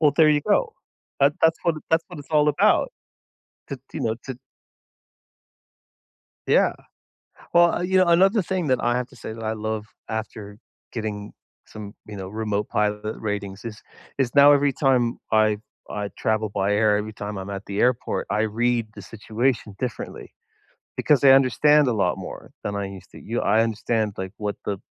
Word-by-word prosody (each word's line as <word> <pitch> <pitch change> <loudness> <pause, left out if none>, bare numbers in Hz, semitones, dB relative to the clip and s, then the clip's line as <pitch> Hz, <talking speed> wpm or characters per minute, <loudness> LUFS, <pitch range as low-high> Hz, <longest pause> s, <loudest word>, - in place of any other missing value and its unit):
Well, 150 -3 +4
there 160 -2 +6
you 150 -1 +3
go. - - +1 0.5
That 140 +2 +4
that's 160 0 +4
how 170 - +3 0.2
that's 160 +1 +3
what - - -10
it's 145 - -11
all 150 -1 +4
about 145 - +3 0.8
to, 135 - -6
you - - -4
know, 110 0 0
to 130 -2 -6 2.1
Yeah, - - +4 0.8
well, 175 0 +4
yeah, 185 +1 +3
another 190 +5 +4
thing 180 -2 -2
that 130 -1 +1
I 120 0 +2
have 125 0 -3
to - - -17
say 110 - -7
that 115 0 -8
I 110 0 -1
love 110 0 -4 0.2
after 110 -2 -6 0.3
getting 105 -3 -5 0.4
some, 105 -1 -9
you 105 -1 -8
know, 95 -1 -6
remote 105 0 -3
pilot 105 +1 -1
ratings 100 -2 -4
is 110 -2 -8 0.4
is 130 -3 0
now 145 0 +8
every 145 -1 +3
time 125 -4 +1
I 110 -1 +3 0.3
I 105 -1 -4
travel 110 -1 0
by 100 0 0
air, 105 0 +3
every 105 +1 -4
time 105 -1 -6
I'm 95 +1 -6
at 100 0 -6
the 100 +1 -4
airport, 125 -1 0
I 105 - +1
read 115 +1 0
the 100 - -9
situation 110 +2 -2
differently 125 -3 -6 0.6
because 145 -2 +2
I 135 - +8
understand 140 +2 +5
a - - +2
lot 100 -5 0
more - - -9
than 100 0 -3
I 100 - -2
used 95 -1 -11
to. - - -11
Y 115 +2 -4
I 110 +3 +3
understand, 110 -1 -1
like, 95 0 -5
what 105 -1 -3
the 100 -2 -3
110 Hz, 180 wpm, -23 LUFS, 105-135 Hz, 2.1 s, now